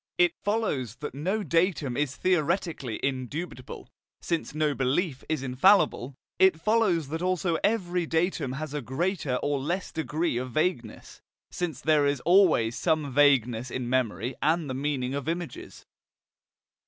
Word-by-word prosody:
It 355 Hz, -1 st, +4 dB
follows 190 Hz, -, -1 dB
that 150 Hz, -, -7 dB
no 185 Hz, +10 st, -2 dB
datum 165 Hz, -5 st, +1 dB
is 145 Hz, 0 st, -1 dB
theoretically 170 Hz, -, 0 dB
indubitable, 130 Hz, +1 st, -4 dB, 0.3 s
since 165 Hz, -3 st, -3 dB
no 155 Hz, -1 st, +1 dB
belief 135 Hz, +2 st, -1 dB
is 155 Hz, -4 st, -1 dB
infallible; 130 Hz, 0 st, +3 dB, 0.2 s
it 190 Hz, -4 st, +5 dB
follows 185 Hz, -7 st, +1 dB
also 185 Hz, -1 st, 0 dB
that 160 Hz, -, -2 dB
every 180 Hz, -5 st, 0 dB
datum 160 Hz, -5 st, 0 dB
has 150 Hz, +1 st, -5 dB
a 150 Hz, -, -2 dB
greater 140 Hz, -, -2 dB
or 145 Hz, -1 st, 0 dB
less 175 Hz, +7 st, -3 dB
degree 160 Hz, -2 st, -1 dB
of 125 Hz, 0 st, -4 dB
vagueness, 155 Hz, -9 st, -2 dB, 0.3 s
since 160 Hz, -6 st, -4 dB
there 150 Hz, -2 st, +3 dB
is 140 Hz, -2 st, 0 dB
always 170 Hz, -, +4 dB
some 155 Hz, -5 st, 0 dB
vagueness 125 Hz, -4 st, +3 dB
in 125 Hz, 0 st, -4 dB
memory 125 Hz, -1 st, -1 dB
and 160 Hz, 0 st, +1 dB
the 130 Hz, -, -3 dB
meaning 135 Hz, -1 st, -2 dB
of 140 Hz, +2 st, -3 dB
images. 170 Hz, 0 st, -6 dB
150 Hz, 140 wpm, -27 LUFS, 130-175 Hz, 0.3 s, it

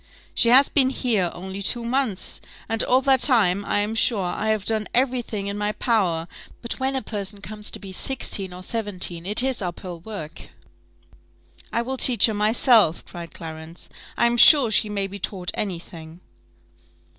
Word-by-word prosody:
"She 230 Hz, -, +4 dB
has 265 Hz, +3 st, +7 dB
been 265 Hz, -3 st, +3 dB
here 225 Hz, -9 st, 0 dB
only 190 Hz, +2 st, -7 dB
two 235 Hz, +4 st, -1 dB
months, 235 Hz, -6 st, -1 dB, 0.3 s
and 225 Hz, 0 st, 0 dB
all 255 Hz, +1 st, +3 dB
that 265 Hz, -1 st, +3 dB
time, 205 Hz, -8 st, +3 dB
I 205 Hz, -, 0 dB
am 210 Hz, +2 st, -2 dB
sure, 225 Hz, -3 st, +1 dB
I 195 Hz, +4 st, -3 dB
have 215 Hz, -2 st, -1 dB
done 220 Hz, -2 st, 0 dB
every 255 Hz, 0 st, +2 dB
thing 210 Hz, -4 st, -6 dB
in 200 Hz, +1 st, -4 dB
my 210 Hz, 0 st, -1 dB
power; 185 Hz, -10 st, 0 dB, 0.4 s
but 235 Hz, -, -4 dB
when 265 Hz, +1 st, -1 dB
a 265 Hz, -, -2 dB
person 205 Hz, -1 st, -6 dB
comes 210 Hz, +1 st, -4 dB
to -, -, -6 dB
be 195 Hz, -2 st, -10 dB
sixteen 195 Hz, -3 st, -1 dB
or 180 Hz, +1 st, -10 dB
seventeen, 185 Hz, -5 st, -3 dB
it 210 Hz, +4 st, +1 dB
is 265 Hz, -3 st, -1 dB
up 175 Hz, -2 st, -5 dB
hill 175 Hz, -2 st, -8 dB
work." 170 Hz, -4 st, -9 dB, 1.2 s
"I 235 Hz, -, -1 dB
will 260 Hz, +2 st, -4 dB
teach 245 Hz, -5 st, +5 dB
her 220 Hz, -, -1 dB
myself," 215 Hz, -3 st, +3 dB
cried 170 Hz, -1 st, -10 dB
Clarence: 160 Hz, +1 st, -9 dB, 0.3 s
"I -, -, +3 dB
am 235 Hz, 0 st, +1 dB
sure 265 Hz, -2 st, +7 dB
she 215 Hz, 0 st, +2 dB
may 200 Hz, -1 st, -2 dB
be 200 Hz, +1 st, -8 dB
taught 180 Hz, -2 st, -3 dB
any 195 Hz, -4 st, -3 dB
thing." 165 Hz, -1 st, -12 dB
210 Hz, 185 wpm, -23 LUFS, 185-235 Hz, 1.2 s, has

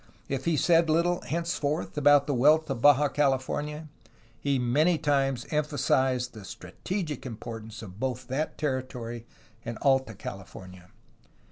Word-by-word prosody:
If 135 Hz, -1 st, -3 dB
he 165 Hz, -2 st, +2 dB
said 165 Hz, +1 st, +4 dB
little, 175 Hz, +3 st, +2 dB
henceforth, 165 Hz, -2 st, -2 dB
about 145 Hz, -1 st, +5 dB
the 145 Hz, -, -1 dB
wealth 150 Hz, +5 st, +4 dB
of 125 Hz, -4 st, -3 dB
Baja 145 Hz, +1 st, +6 dB
California, 145 Hz, +2 st, -1 dB, 0.5 s
he 140 Hz, -1 st, 0 dB
many 145 Hz, +8 st, +2 dB
times 135 Hz, -5 st, 0 dB
emphasized 130 Hz, -4 st, +1 dB
the 110 Hz, -3 st, -10 dB
strategic 150 Hz, -, -5 dB
importance 115 Hz, -2 st, -8 dB
of 95 Hz, -1 st, -11 dB
both 130 Hz, -2 st, -3 dB
that 135 Hz, +5 st, -2 dB
territory 125 Hz, -5 st, -4 dB, 0.4 s
and 115 Hz, -1 st, -5 dB
Alta 135 Hz, -5 st, +2 dB
California. 95 Hz, -2 st, -10 dB
135 Hz, 130 wpm, -28 LUFS, 120-150 Hz, 0.5 s, Baja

